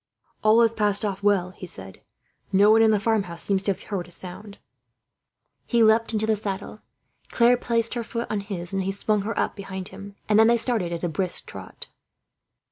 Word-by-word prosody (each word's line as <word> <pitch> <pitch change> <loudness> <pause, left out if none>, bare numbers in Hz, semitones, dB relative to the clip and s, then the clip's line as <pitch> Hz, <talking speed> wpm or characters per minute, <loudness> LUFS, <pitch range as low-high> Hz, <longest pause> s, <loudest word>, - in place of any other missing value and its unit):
"All 215 +2 +5
has 230 -1 +2
passed 210 -1 +2
off 195 -2 -3
well," 200 -3 +2
he 185 0 -10
said. 95 - -5 0.5
"No 200 +2 +5
one 225 +1 +6
in 225 - +5
the 215 -1 +3
farmhouse 200 -6 -1
seems 195 -1 0
to 200 - 0
have 190 - -6
heard 190 -4 -4
a - - -16
sound." 185 +4 -8 1.1
He 235 -2 +3
leapt 220 +1 +3
into 220 -1 0
the 220 0 +2
saddle. 205 0 -6 0.5
Claire 240 +1 +4
placed 230 -2 -1
her 235 -1 -3
foot 235 +1 -4
on 215 - -1
his, 195 -3 -6
and 195 - 0
he 190 +1 -1
swung 205 +1 0
her 220 +3 -4
up - - -1
behind 190 -2 -6
him; 200 0 -11
and 215 0 +4
they - - +8
then 235 +1 +4
started 225 -7 0
at 170 0 -5
a - - +1
brisk 180 +2 -2
trot. - - -10
205 Hz, 210 wpm, -24 LUFS, 190-220 Hz, 1.1 s, they